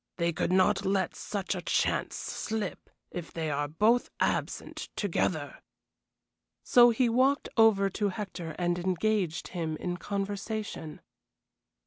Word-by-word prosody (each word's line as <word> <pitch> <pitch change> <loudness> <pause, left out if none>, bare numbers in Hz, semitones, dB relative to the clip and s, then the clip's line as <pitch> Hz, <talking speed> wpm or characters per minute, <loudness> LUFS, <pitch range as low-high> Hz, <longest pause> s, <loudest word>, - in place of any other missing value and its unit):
They 170 -1 +1
could - - -1
not 185 +1 +3
let 190 -2 +1
such 200 -2 -3
a 180 - -4
chance - - 0
slip, 220 -1 -4 0.2
if 175 -2 -6
they 160 -2 -2
are 145 +1 0
both 215 +11 +2
absent - - -2
together." 165 -6 -1 1.0
So 240 -1 +7
he 240 +2 +2
walked 260 +5 +2
over 220 -4 +5
to 205 +2 0
Hector 185 -5 -5
and 175 0 0
engaged 185 -1 0
him 160 -3 -3
in 175 +1 -3
conversation. 200 -3 -4
190 Hz, 125 wpm, -29 LUFS, 170-215 Hz, 1.0 s, So